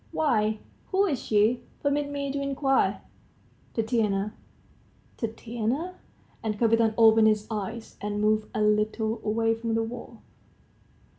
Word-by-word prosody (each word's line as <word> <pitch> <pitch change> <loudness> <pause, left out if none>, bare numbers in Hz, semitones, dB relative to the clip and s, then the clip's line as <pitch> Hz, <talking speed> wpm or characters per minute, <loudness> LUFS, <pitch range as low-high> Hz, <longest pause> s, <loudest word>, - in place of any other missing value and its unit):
"Why, 215 -8 +1 0.3
who 390 +1 +2
is 290 -10 -1
she, 215 +3 +2 0.2
permit 285 0 +1
me 280 -1 -3
to 280 0 -2
inquire?" 275 -1 +1 0.7
"Tatiana." 215 -3 0 0.8
"Tatiana?" 235 +8 -3 0.5
And 215 -2 -2
Kapiton 225 -1 +3
opened 225 -1 +7
his 215 -1 +2
eyes, 220 +2 -5
and 205 0 -2
moved 215 0 +2
a 215 - +1
little 215 +1 +1
away 225 +1 +1
from 225 0 -2
the 225 - +1
wall. 235 0 -8
225 Hz, 125 wpm, -27 LUFS, 215-245 Hz, 0.8 s, opened